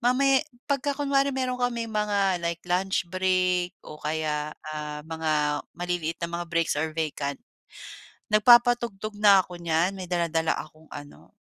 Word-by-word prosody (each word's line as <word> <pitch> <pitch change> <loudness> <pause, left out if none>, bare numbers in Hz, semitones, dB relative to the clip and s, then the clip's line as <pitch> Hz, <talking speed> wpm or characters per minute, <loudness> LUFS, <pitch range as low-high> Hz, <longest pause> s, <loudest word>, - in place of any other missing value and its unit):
mamaya 265 +2 +3 0.3
'pagka 280 0 0
kunwari 280 -1 +2
meron 255 -1 -2
kaming 235 -2 -1
mga 200 -3 +1
like 170 0 -2
luch 185 +2 0
break 185 -1 +1
o 150 - -10
kaya, 150 -1 -2 0.2
ah, 150 -1 -5
mga 155 -2 0 0.2
maliliit 175 -2 -2
na 170 - -4
mga 175 - -5
breaks 165 -2 +1
or 160 0 -2
vacant, 145 -3 -2 1.0
nagpapatugtog 235 -2 +4
na 200 -2 +7
ako 180 - -10
niyan, 170 +2 +1
may 185 -1 -6
dala-dala 165 -2 0
akong 155 +1 -10
ano 145 0 -11
180 Hz, 140 wpm, -26 LUFS, 160-215 Hz, 1.0 s, na